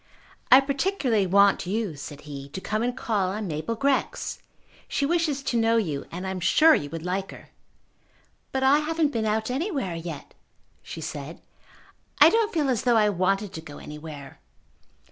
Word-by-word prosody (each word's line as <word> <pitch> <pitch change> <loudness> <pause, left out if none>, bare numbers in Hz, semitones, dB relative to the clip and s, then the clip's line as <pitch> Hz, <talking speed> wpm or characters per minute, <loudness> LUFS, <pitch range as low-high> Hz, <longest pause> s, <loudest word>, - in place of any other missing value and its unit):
"I 260 - +10
particularly 275 - 0
want 200 0 +4
you," 205 -4 -2
said 145 +1 -9
he, 140 -2 -9
"to - - -4
come 215 +3 -2
and 245 +1 -1
call 205 -7 0
on 210 +3 -4
Mabel 160 +7 -3
Grex. 275 +3 -1 0.5
She 280 - -1
wishes 310 -3 0
to 240 - -1
know 225 +1 +3
you, 155 -11 -2
and 180 +3 -6
I 190 - -2
am 190 - -4
sure 310 - +5
you 145 - -1
would 165 +1 -7
like 190 +2 -2
her." - - -12 1.0
"But 265 0 -1
I 275 +3 +5
haven't 310 -1 0
been 225 -2 -1
out 220 +2 -1
anywhere 270 - -2
yet," 165 -3 -7 0.5
she 165 - -8
said. 155 0 -6 0.8
"I - - +8
don't 450 -1 +2
feel 310 -4 0
as 240 - 0
though 240 -2 +3
I 210 -1 +4
wanted 195 +1 0
to 160 - -6
go 150 -2 -11
anywhere." 150 -2 -10
210 Hz, 180 wpm, -25 LUFS, 165-270 Hz, 1.0 s, I